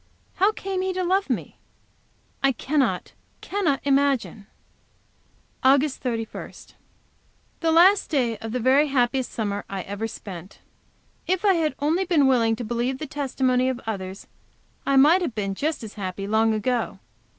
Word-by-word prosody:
How 390 Hz, +3 st, +4 dB
came 385 Hz, -3 st, -4 dB
he 375 Hz, 0 st, -1 dB
to 370 Hz, 0 st, -2 dB
love 380 Hz, +3 st, +1 dB
me? -, -, -3 dB, 0.8 s
I 275 Hz, -1 st, +3 dB
cannot, 280 Hz, +2 st, -1 dB, 0.3 s
cannot 345 Hz, -9 st, 0 dB
imagine! 275 Hz, -7 st, +1 dB, 1.2 s
August 275 Hz, +2 st, +3 dB
31. 230 Hz, -3 st, -4 dB, 1.1 s
The 330 Hz, -1 st, +1 dB
last 370 Hz, +5 st, +5 dB
day 250 Hz, -7 st, +1 dB
of 225 Hz, -, -6 dB
the 250 Hz, -, -1 dB
very 265 Hz, +5 st, +4 dB
happiest 260 Hz, -1 st, 0 dB
summer 205 Hz, -2 st, -3 dB
I 195 Hz, -2 st, -4 dB
ever 205 Hz, +3 st, -4 dB
spent. 190 Hz, -4 st, -9 dB, 0.7 s
If 375 Hz, +2 st, 0 dB
I 395 Hz, -, +6 dB
had 315 Hz, -5 st, 0 dB
only 320 Hz, +6 st, +1 dB
been 330 Hz, -6 st, +3 dB
willing 235 Hz, -4 st, +3 dB
to 240 Hz, -, -6 dB
believe 240 Hz, +3 st, -2 dB
the 310 Hz, -, -5 dB
testimony 260 Hz, -3 st, 0 dB
of 255 Hz, -2 st, -3 dB
others 195 Hz, -3 st, -5 dB, 0.6 s
I 275 Hz, -, +3 dB
might 305 Hz, +7 st, +6 dB
have 315 Hz, -10 st, -3 dB
been 195 Hz, -2 st, -2 dB
just 295 Hz, +5 st, -2 dB
as 215 Hz, -, -8 dB
happy 195 Hz, -1 st, -5 dB
long 220 Hz, +2 st, +2 dB
ago. 235 Hz, -1 st, -1 dB
260 Hz, 150 wpm, -24 LUFS, 225-310 Hz, 1.2 s, I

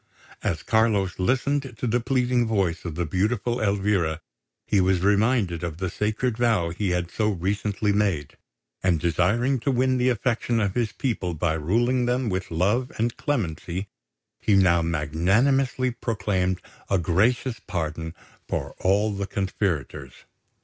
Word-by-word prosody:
As -, -, -2 dB
Carlos 105 Hz, -5 st, +1 dB
listened 130 Hz, +4 st, 0 dB
to -, -, -3 dB
the 120 Hz, +1 st, +2 dB
pleading 125 Hz, -1 st, +1 dB
voice 95 Hz, -7 st, 0 dB
of 85 Hz, -3 st, -4 dB
the 85 Hz, +1 st, -1 dB
beautiful 110 Hz, +8 st, 0 dB
Elvira, 100 Hz, -6 st, +1 dB, 0.5 s
he 100 Hz, -, +2 dB
was 95 Hz, -1 st, +2 dB
reminded 100 Hz, -3 st, +2 dB
of 85 Hz, -2 st, -4 dB
the 95 Hz, -1 st, -3 dB
sacred 110 Hz, +3 st, -1 dB
vow 110 Hz, -9 st, +2 dB
he 95 Hz, +3 st, -2 dB
had 90 Hz, -1 st, -1 dB
so 110 Hz, -1 st, +1 dB
recently 105 Hz, +2 st, -1 dB
made; 100 Hz, -8 st, 0 dB, 0.5 s
and, 90 Hz, -3 st, +2 dB
desiring 100 Hz, -, +1 dB
to 140 Hz, -, -2 dB
win 130 Hz, 0 st, +2 dB
the 125 Hz, +1 st, +3 dB
affection 120 Hz, -1 st, 0 dB
of 100 Hz, -3 st, 0 dB
his 115 Hz, -2 st, 0 dB
people 95 Hz, -10 st, -2 dB
by 80 Hz, +1 st, 0 dB
ruling 120 Hz, +11 st, +1 dB
them 125 Hz, -1 st, 0 dB
with 95 Hz, 0 st, -3 dB
love 100 Hz, +10 st, +1 dB
and 115 Hz, +1 st, 0 dB
clemency, 95 Hz, -, -3 dB, 0.5 s
he 105 Hz, -, +2 dB
now 90 Hz, -3 st, +4 dB
magnanimously 95 Hz, -, +1 dB
proclaimed 100 Hz, -6 st, -1 dB, 0.3 s
a 100 Hz, -, +3 dB
gracious 110 Hz, -, +1 dB
pardon 80 Hz, -2 st, -3 dB, 0.3 s
for -, -, -3 dB
all 100 Hz, +3 st, +2 dB
the 100 Hz, 0 st, -3 dB
conspirators. 90 Hz, -, -2 dB
100 Hz, 145 wpm, -25 LUFS, 90-120 Hz, 0.5 s, now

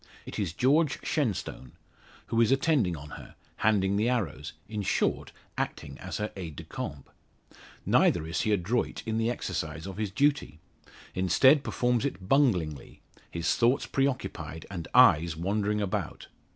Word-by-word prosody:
It -, -, -6 dB
is 95 Hz, -6 st, -1 dB
George 140 Hz, -, +2 dB
Shenstone; 110 Hz, -, -2 dB, 0.5 s
who 115 Hz, -, +1 dB
is 115 Hz, -, +3 dB
attending 135 Hz, -, +2 dB
on 75 Hz, +1 st, -10 dB
her, -, -, -15 dB, 0.2 s
handing 100 Hz, -2 st, +2 dB
the 110 Hz, +4 st, +2 dB
arrows 85 Hz, -, -2 dB
in 105 Hz, -1 st, -4 dB
short, 100 Hz, -, 0 dB, 0.3 s
acting -, -, -4 dB
as -, -, -5 dB
her 105 Hz, 0 st, -3 dB
aide 85 Hz, -6 st, -6 dB
de -, -, -8 dB
camp. 70 Hz, -1 st, -6 dB, 0.8 s
Neither 85 Hz, -3 st, +3 dB
is 80 Hz, +2 st, -2 dB
he 110 Hz, -, 0 dB
adroit 105 Hz, +5 st, 0 dB
in 110 Hz, 0 st, -1 dB
the 115 Hz, +1 st, +1 dB
exercise 80 Hz, -8 st, -4 dB
of 95 Hz, 0 st, -7 dB
his 105 Hz, -2 st, -1 dB
duty; 140 Hz, -, 0 dB, 0.5 s
instead 130 Hz, -, +4 dB
performs 125 Hz, -3 st, 0 dB
it 95 Hz, -10 st, -4 dB
bunglingly; 95 Hz, -, +1 dB, 0.3 s
his 85 Hz, -1 st, 0 dB
thoughts 120 Hz, +3 st, +2 dB
preoccupied, 135 Hz, -, -2 dB
and 85 Hz, -4 st, -5 dB
eyes 80 Hz, +1 st, +6 dB
wandering 105 Hz, +4 st, 0 dB
about. 100 Hz, -2 st, -3 dB
105 Hz, 150 wpm, -28 LUFS, 85-125 Hz, 0.8 s, eyes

